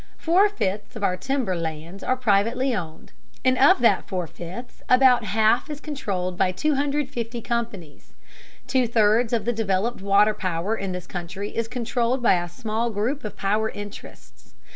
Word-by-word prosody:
Four 370 +5 +4
fifths 210 - -3
of 220 - -6
our 180 -2 +2
timber 260 -1 -1
lands 165 +3 -5
are 255 - +1
privately 235 +3 +2
owned, 160 -5 -7 0.3
and 255 0 +4
of 265 0 +5
that 235 - +3
four 185 -5 -2
fifths 180 +10 -9
about 255 -2 +5
half 220 +5 +2
is 295 -1 -5
controlled 195 - -4
by 185 - +3
250 275 -1 -1
companies. 220 -10 -5 0.5
Two 255 -1 +1
thirds 225 +1 +3
of 225 -4 0
the 240 - +1
developed 215 +1 -1
water 200 +2 +4
power 185 +2 -2
in 195 -3 -4
this 180 -1 -5
country 185 +3 -6
is 230 0 -1
controlled 245 +1 -1
by 180 -6 +4
a 175 - -7
small 225 +5 -2
group 230 +7 -2
of 210 - -6
power 215 +3 0
interests. 205 - -11
220 Hz, 165 wpm, -24 LUFS, 190-250 Hz, 0.5 s, of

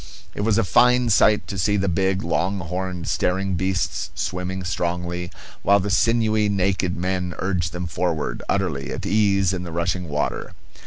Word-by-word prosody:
It - - -4
was 105 0 +2
a 115 - +3
fine 125 +6 +4
sight 105 +1 +4
to 95 - -5
see 105 +3 +2
the 100 0 0
big, 95 +1 +1
long 95 +4 0
horned, 90 -1 -4
staring 95 +1 0
beasts 95 +2 -1
swimming 90 0 -3
strongly, 90 0 -2 0.3
while 100 +1 +4
the 100 +1 -2
sinewy 110 -1 +2
naked 95 -2 0
men 90 -1 -2
urged 90 -3 -1
them 90 +1 -4
forward, 80 -1 -2
utterly 80 -9 -1
at - - -5
ease 100 -3 +2
in 90 - -3
the 90 -2 -6
rushing 85 +1 -1
water. 75 0 -2
95 Hz, 165 wpm, -23 LUFS, 90-100 Hz, 0.3 s, fine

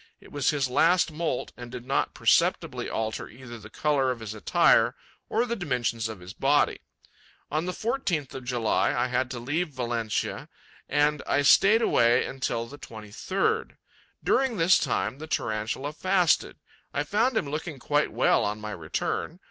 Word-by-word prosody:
It - - -17
was 145 -3 +1
his 140 -3 +1
last 165 +6 +3
moult 155 -5 -3
and 120 -1 -9
did 125 -1 -7
not 135 +1 0
perceptibly - - +2
alter 110 0 -3
either 120 -1 -10
the 110 - -12
colour 140 0 +1
of 125 -2 -2
his 110 -2 -6
attire 110 - +3 0.3
or 230 +3 +1
the 235 -1 -2
dimensions 125 - -1
of 110 -5 -8
his 90 +2 -9
body. 140 +5 +2 0.7
On 155 +3 0
the - - 0
14th 195 - -2
of 130 - -7
July, 120 -3 +1
I 125 - 0
had 125 +1 0
to 125 - -5
leave 150 +8 -1
Valencia; 120 -5 -3 0.4
and 150 0 +2
I 145 - +2
stayed 210 +10 +6
away 120 - +4
until 130 -3 -2
the 145 +5 -12
23rd. 155 - -3 0.5
During 265 -5 +2
this 170 +2 +5
time, 125 +6 -1
the 155 - -7
Tarantula 110 +3 -2
fasted; 185 0 +2 0.4
I 145 - +1
found 220 - +1
him 150 - 0
looking 150 +1 -4
quite 145 +3 0
well - - +3
on 105 +1 -2
my 105 0 -6
return. 90 - -3
135 Hz, 165 wpm, -27 LUFS, 115-165 Hz, 0.7 s, stayed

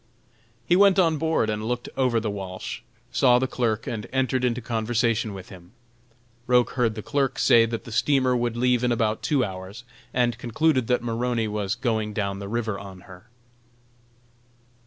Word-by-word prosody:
He 175 - +3
went 200 0 +5
on 165 -5 +3
board 160 -7 +1
and 105 0 -2
looked 120 0 -3
over 125 -3 +2
the 110 -2 -2
Walsh, 95 -2 -6 0.3
saw 125 -2 +4
the 130 - +1
clerk 115 -4 -1
and 110 -3 -4
entered 130 -1 0
into 125 -1 +1
conversation 115 -1 0
with 95 -2 -9
him. 90 +1 -14 0.7
Roch 125 -1 +3
heard 115 -4 0
the 110 - -6
clerk 140 -2 0
say 115 -1 +5
that 115 0 -4
the 115 - -10
steamer 130 +1 +2
would 120 -1 -1
leave 125 0 +2
in 125 - +2
about 110 -2 0
two 140 -5 +1
hours, 95 +4 -8 0.3
and 120 -2 0
concluded 130 +1 +1
that 125 -1 +1
Maroney 120 -1 -1
was 105 -1 -2
going 110 -4 -1
down 100 -2 -2
the 100 - -6
river 110 -3 -2
on 95 -2 -10
her. 90 +1 -15
120 Hz, 175 wpm, -25 LUFS, 105-125 Hz, 0.7 s, went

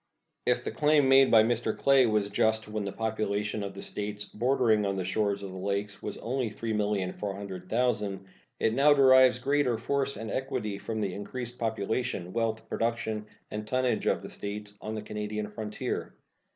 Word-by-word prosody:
If - - +2
the - - -3
claim 150 -2 +3
made 135 0 +7
by 110 -1 +7
Mr. 115 -1 0
Clay 135 -2 +5
was 105 -2 +1
just 110 +1 +1
when 105 -1 -3
the 100 - -3
population 105 -1 -2
of 100 -1 -6
States 105 0 -3
bordering 115 -1 +2
on 100 -1 0
the 95 - -2
shores 100 +1 0
of 95 - -6
the 95 - -7
Lakes 100 +1 -2
was 105 - -4
only 125 0 -2
3,400,000, 105 0 -2 0.4
it 110 - +2
now 145 +3 +5
derives 130 -2 +7
greater 135 -2 +1
force 140 +2 -1
and 110 +1 -5
equity 130 -7 -2
from 110 0 -3
the 100 -3 -1
increased 120 +4 -6
population, 110 -3 -2
wealth, 115 -1 -1
production, 110 -2 -2 0.2
and 105 0 -5
tonnage 130 0 0
of - - +1
the - - -7
States 105 0 -6
on 110 +1 -4
the 105 - -5
Canadian 105 0 -4
frontier. 105 0 -4
110 Hz, 165 wpm, -29 LUFS, 105-125 Hz, 0.4 s, made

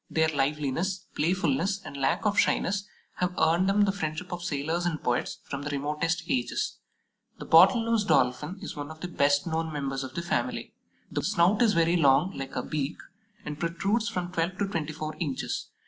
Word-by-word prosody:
Their 160 0 +2
liveliness, 150 +6 -1
playfulness, 175 +3 +1
and - - -8
lack 135 +9 0
of 210 -1 +2
shyness 200 +1 +1 0.3
have 180 0 -1
earned 170 +4 +3
them 205 +1 +3
the 205 -1 +4
friendship 175 -1 -4
of 175 - -4
sailors 160 +1 -1
and 170 -3 -2
poets 120 0 0
from 140 -2 -5
the 145 - -4
remotest 150 +4 -1
ages. 125 -2 -1 0.6
The - - -8
Bottle 195 +8 +6
nose 230 -2 +2
Dolphin 150 +1 +1
is - - -6
one 145 0 -5
of 155 0 -11
the 180 - -3
best 145 -4 +2
known 160 -1 -2
members 135 -2 -3
of 130 0 -8
the 170 - -2
family. 170 - -2 0.4
The - - -1
snout 190 +4 +3
is 225 -3 +5
very 170 0 +3
long, 145 +3 +4
like 135 0 -6
a 125 - -1
beak, 150 0 -3 0.5
and 150 0 -5
protrudes 195 +6 0
from 180 -1 -3
twelve 175 +2 -1
to 200 - 0
twenty 160 -5 -3
four 155 0 -5
inches. 145 -6 -3
165 Hz, 190 wpm, -28 LUFS, 145-185 Hz, 0.6 s, Bottle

